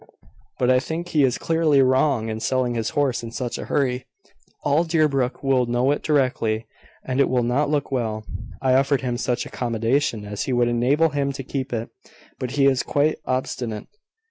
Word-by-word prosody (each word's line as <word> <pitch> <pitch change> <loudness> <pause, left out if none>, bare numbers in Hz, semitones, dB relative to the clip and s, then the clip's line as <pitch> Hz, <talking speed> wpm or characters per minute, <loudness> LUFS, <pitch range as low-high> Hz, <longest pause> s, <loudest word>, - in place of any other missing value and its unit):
But 125 0 +3
I 125 - +5
think 165 +6 -5
he 155 -4 +2
is 125 -2 +2
clearly 160 -3 +2
wrong 130 -2 +2
in 110 0 -3
selling 125 +1 0
his 115 -2 -1
horse 140 -4 +1
in 115 -1 -7
such 120 0 -4
a - - -5
hurry. 130 -2 -1 0.6
All 145 +3 +3
Deerbrook 150 -6 +1
will 130 -3 +2
know 120 +3 +2
it 145 - -1
directly, 125 -7 +1 0.4
and 130 +1 -2
it 140 - +4
will 125 -1 +2
not 135 +5 +1
look 145 -1 -1
well. 110 -4 -2 0.4
I 130 -1 +3
offered 135 +1 +3
him 125 -2 -2
such 125 -2 -1
accommodation 115 -1 -1
as 105 0 -4
would 120 -2 +2
enable 130 +7 +2
him 140 -2 -1
to 135 0 -6
keep 135 0 -4
it; 115 -1 -3 0.5
but 130 - -3
he 140 - +4
is 135 -2 +4
quite 150 +2 +1
obstinate. 125 -3 -3
130 Hz, 185 wpm, -23 LUFS, 120-140 Hz, 0.6 s, I